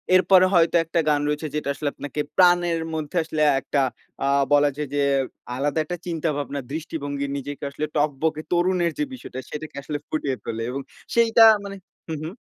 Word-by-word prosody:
এরপরে 185 0 +6
হয়তো 170 0 +4
একটা 165 +1 0
গান 145 -1 +2
রয়েছে, 150 +1 -1
যেটা 150 -2 -2
আসলে 145 +1 -2
আপনাকে 145 +1 -6 0.2
প্রাণের 175 -2 +4
মধ্যে 155 +1 -4
আসলে 155 -1 -3 0.2
একটা 140 - -1 0.5
আ - - +1 0.3
বলা 145 0 +5
যায় 150 - -3
যে, 145 - +2 0.5
আলাদা 145 +4 0
একটা 175 +3 -5
চিন্তাভাবনা, 150 -4 -2
দৃষ্টিভঙ্গি 145 -3 -4
নিজেকে 145 +1 -6
আসলে 150 +2 -3
টকবকে 150 +2 0
তরুণের 175 -1 +2
যে - - +2
বিষয়টা, 230 - -8
সেটাকে 150 +1 -7
আসলে 150 +1 -3
ফুটিয়ে 145 -4 -1
তোলে 115 0 -3
এবং 135 +2 -3 0.3
সেইটা 230 -1 +6 0.2
মানে 200 0 -6 0.3
হু, - - -2
হু। 155 - -4
155 Hz, 170 wpm, -24 LUFS, 145-175 Hz, 0.5 s, এরপরে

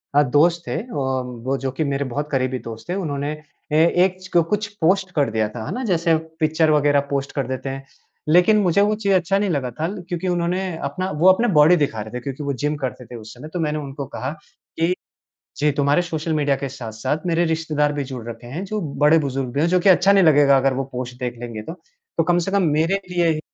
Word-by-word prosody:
अ, 145 - +7
दोस्त 160 +6 +3
थे - - -2 0.2
और 130 -2 -1 0.2
वो 135 +1 +1
जो 135 0 -3
कि 160 - +1
मेरे 140 -1 -1
बहुत 145 +4 -4
करीबी 130 -1 0
दोस्त 115 +6 -9
थे, 180 - 0
उन्होंने 145 -6 -2 0.4
ए 155 +2 +5 0.2
एक 185 -1 -2
छ 185 -1 -1
कुछ 210 0 0
पोस्ट 190 +2 +2
कर 145 -5 +2
दिया 110 -1 +1
था। 110 0 -7
है - - -5
ना? 255 - -3
जैसे 170 -6 +2 0.2
पिक्चर 160 0 +2
वग़ैरह 145 -1 +3
पोस्ट 140 -1 -2
कर 135 -4 -1
देते 130 +1 -4
हैं। 135 0 -6 0.4
लेकिन 180 +6 +5
मुझे 190 +1 +3
वो 210 +1 +2
चीज़ 200 -2 0
अच्छा 185 +1 +2
नहीं 200 -1 0
लगा 140 -6 -1
था 155 +7 -3 0.2
क्योंकि 175 0 -3
उन्होंने 175 +1 0 0.2
अपना 165 +7 -3
वो 180 - +6
अपना 210 +6 +4
बॉडी 150 +3 +6
दिखा 140 -9 -1
रहे 110 +2 -9
थे, 125 - -3
क्योंकि 140 +1 -5
वो 140 - -1
जिम 145 +4 -1
करते 125 -1 -4
थेI 120 +2 -9
उस 110 +1 -11
समय 125 +5 -10
तो 180 - -2
मैंने 155 -1 -1
उनको 140 -1 -6
कहा 130 +1 -5 0.5
कि, 170 +2 +2 0.6
"ये 150 +2 +2
तुम्हारे 145 +4 +2
सोशल 165 -2 -3
मीडिया 145 -2 +1
के 140 0 -4
साथ-साथ 130 +4 -4
मेरे 170 0 +2
रिश्तेदार 155 -3 0
भी 145 -1 -3
जुड़ 125 -4 -7
रखे 115 +1 -8
हैं। 155 +10 -5
जो 210 +2 -3 0.2
बड़े 160 +2 +6
बुजुर्ग 135 -3 -2
भी 140 - +1
हैं 160 - +3
जो 180 0 +3
कि 195 - +2
अच्छा 190 +1 +6
नहीं 195 -3 +5
लगेगा 145 -3 +6
अगर 135 0 +2
वो 135 - -2
पोस्ट 125 0 -5
देख 125 -1 -4
लेंगे 115 -3 -6
तो। 160 - -7 0.5
तो - - +5
कम 175 +1 +2
से - - 0
कम 200 -1 +2 0.2
मेरे 180 +5 +1
लिए" 175 -1 +2
ही 155 - -1
150 Hz, 240 wpm, -21 LUFS, 135-175 Hz, 0.6 s, अ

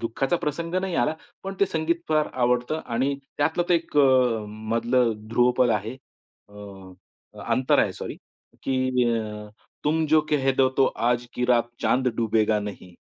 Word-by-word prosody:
दुःखाचा 130 +7 -1
प्रसंग 165 +3 -3
नाही 185 -1 -1
आला, 125 +5 +1 0.3
पण 195 0 -5
ते 200 - +5
संगीत 165 0 -1
फार 155 -1 +2
आवडतं 125 +4 0
आणि 130 +4 0 0.2
त्यातलं 160 +4 +1
तर 175 - +4
एक 165 -2 -2
अ, 130 -5 +4
मधलं 115 +3 0 0.2
ध्रुवपद 125 +1 +3
आहे 110 +3 -2 0.5
अ, 105 - -19 0.9
अंतरा 125 +2 +3
आहे - - -1
सॉरी - - -7 0.5
की 130 -1 +1
अ, 105 -1 -6 0.4
"तुम 160 +2 +1
जो 155 +1 +4
कहे 135 -3 +2
दो 130 0 +3
तो 135 - +5 0.2
आज 120 0 -1
की 125 - -1
रात 120 -1 +2
चांद 130 0 +2
डूबेगा 110 -1 +1
नहीं." 100 -3 -8
125 Hz, 155 wpm, -24 LUFS, 115-150 Hz, 0.9 s, ते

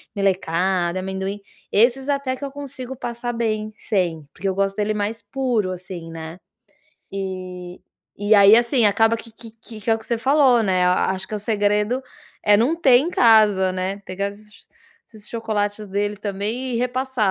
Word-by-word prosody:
melecada, 185 -2 0
amendoim, 190 +2 -4 0.3
esses 250 +5 +3
até 280 -2 -1
que 280 - -11
eu 275 - -6
consigo 265 -2 -7
passar 240 -1 -4
bem 215 -2 -2
sem, 175 -9 -2
porque 195 - -4
eu 190 - -1
gosto 195 0 0
dele 210 0 0
mais 210 +2 -3
puro, 240 -7 -1
assim, 180 -2 -8
né. 165 +1 -8 0.7
E 185 -2 -6 0.4
e 210 +1 +4
aí, 200 +1 +8
assim, 240 0 +3
acaba 225 +2 +3
que 230 0 -11
que 230 0 -13
que 225 -2 -10
que 225 - -2
é 225 - +5
o - - -3
que 220 - -13
você 235 - 0
falou, 265 -2 +4
né, 185 -3 +2
a 180 +1 +2
acho 190 0 -4
que 215 - -5
o - - -2
segredo 210 +3 0 0.4
é 205 0 +5
não 250 +9 +2
ter 270 -7 +5
em 305 +8 +1
casa, 215 - +5
né, 190 +2 -3
pegar 195 +2 -2
esses 210 0 -16 0.4
esses 215 -1 -12
chocolates 210 -2 -2
dele 205 +2 -1
também 210 +5 -3
e - - 0
repassar 250 -3 0
210 Hz, 180 wpm, -22 LUFS, 190-235 Hz, 0.7 s, aí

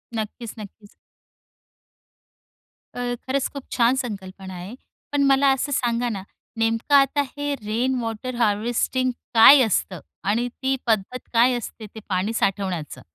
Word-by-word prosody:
नक्कीच, 220 +1 -5
नक्कीच. 205 0 -12 2.0
अ, - - -5 0.2
खरंच 260 +3 -2
खूप 280 -2 -7
छान 240 +1 +3
संकल्पना 195 -6 -6
आहे. 180 +6 -8 0.4
पण 290 -1 +2
मला 275 0 +4
असं 275 +2 -2
सांगा 240 -2 0
ना, 200 -4 -4 0.3
नेमकं 225 +5 +1
आता 275 +1 +4 0.2
हे 290 0 -1
रेन 235 +5 0
वॉटर 230 +2 -4
हार्वेस्टिंग 240 +3 +1 0.2
काय 240 +5 +9
असतं? 190 -4 -1 0.2
आणि 220 +5 +1
ती 265 +2 -2
पद्धत 220 +3 0
काय 240 +2 +5
असते 230 -1 -8
ते - - -6
पाणी 190 +3 0
साठवण्याचं? 190 -7 -2
230 Hz, 130 wpm, -23 LUFS, 205-260 Hz, 2.0 s, काय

